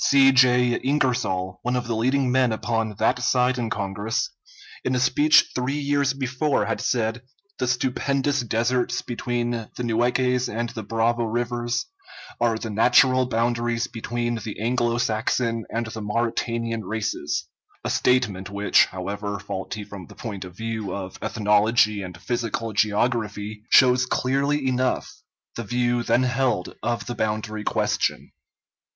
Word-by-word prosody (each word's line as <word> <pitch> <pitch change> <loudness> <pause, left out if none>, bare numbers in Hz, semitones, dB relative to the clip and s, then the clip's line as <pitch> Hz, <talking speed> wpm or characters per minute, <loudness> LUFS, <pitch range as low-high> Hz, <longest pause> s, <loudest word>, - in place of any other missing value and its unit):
C. 135 -1 +6
J. 125 -1 +4
Ingersoll, 125 -10 0
one 125 +1 -1
of 125 -1 -1
the 115 0 -2
leading 130 +3 +1
men 130 -2 +3
upon 110 -1 -1
that 125 +5 +1
side 125 +1 +2
in 115 -2 -2
Congress, 105 +1 -2 0.5
in 130 - 0
a - - +1
speech 145 +4 +4
three 130 +3 -1
years 140 -1 +1
before 135 -2 0
had 115 - -2
said: 115 -1 0 0.4
"The 130 - 0
stupendous 135 +3 0
deserts 120 +2 0
between 120 0 -2
the 115 +1 -5
Nueces 125 +2 +1
and 115 +2 -2
the 115 -1 -6
Bravo 115 +2 0
rivers 120 +1 -1 0.5
are 115 -1 +2
the 110 -1 -5
natural 130 +4 +4
boundaries 120 0 0
between 120 0 -3
the 105 -2 -6
Anglo 120 +1 +1
Saxon 115 0 0
and 115 +1 -2
the 110 0 -6
Mauritanian 115 +1 -1
races"; 105 -7 -2 0.4
a - - -2
statement 110 -7 +1
which, 100 +1 +4
however 100 +2 -4
faulty 100 +2 -5
from 100 -4 -10
the - - -14
point 105 -5 -6
of 90 0 -12
view 110 -4 -3
of 95 -1 -7
ethnology 105 -1 +2
and 90 -3 -8
physical 115 +1 -3
geography, 105 0 0
shows 125 0 +5
clearly 140 +2 0
enough 130 0 0 0.4
the 115 - -4
view 120 +2 0
then 120 +2 +2
held 125 -7 0
of 120 +1 -2
the 120 - -4
boundary 110 -1 -2
question. - - -1
120 Hz, 145 wpm, -24 LUFS, 110-125 Hz, 0.5 s, C